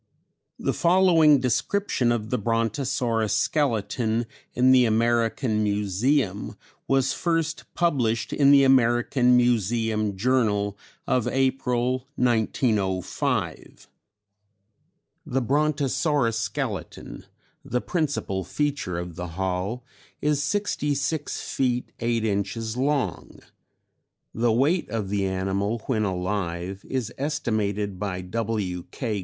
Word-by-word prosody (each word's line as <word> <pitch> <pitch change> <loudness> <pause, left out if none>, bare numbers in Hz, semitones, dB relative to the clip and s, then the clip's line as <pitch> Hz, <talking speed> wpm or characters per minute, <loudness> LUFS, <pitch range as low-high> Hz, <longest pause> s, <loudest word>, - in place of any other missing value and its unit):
The - - -1
following 170 -5 +5
description 135 - 0
of 110 -2 -2
the 125 - +1
Brontosaurus 115 0 0
skeleton 115 -4 0 0.3
in 125 +1 +5
the 130 -1 +6
American 115 0 +1
Museum 105 +2 0 0.3
was 135 -1 +2
first 165 -2 -1
published 125 -10 0
in 140 -1 +4
the 140 -1 +7
American 125 -1 +4
Museum 110 -3 +1
Journal 105 -3 +1 0.3
of 125 -2 +1
April, 130 -1 0
1905: 110 - -1 1.4
"The 135 +1 -1
Brontosaurus 145 -3 +1
skeleton, 110 -2 -5 0.4
the 125 - -1
principal 140 - -2
feature 145 -9 -2
of 85 -1 -5
the 90 +2 -5
hall, 95 +6 -2 0.3
is 150 -1 +1
sixty 150 -2 -1
six 145 +2 -2
feet 125 -2 -1
eight 115 -1 0
inches 110 +2 -2
long. 140 +1 -2 0.9
(The 115 +1 +1
weight 145 +10 +1
of 105 -3 -3
the 100 -1 0
animal 95 +4 -2
when 110 -5 0
alive 95 0 -3
is 125 -4 -2
estimated 105 -9 -1
by 95 -2 -3
W.K. 105 +1 -3
120 Hz, 100 wpm, -25 LUFS, 105-135 Hz, 1.4 s, the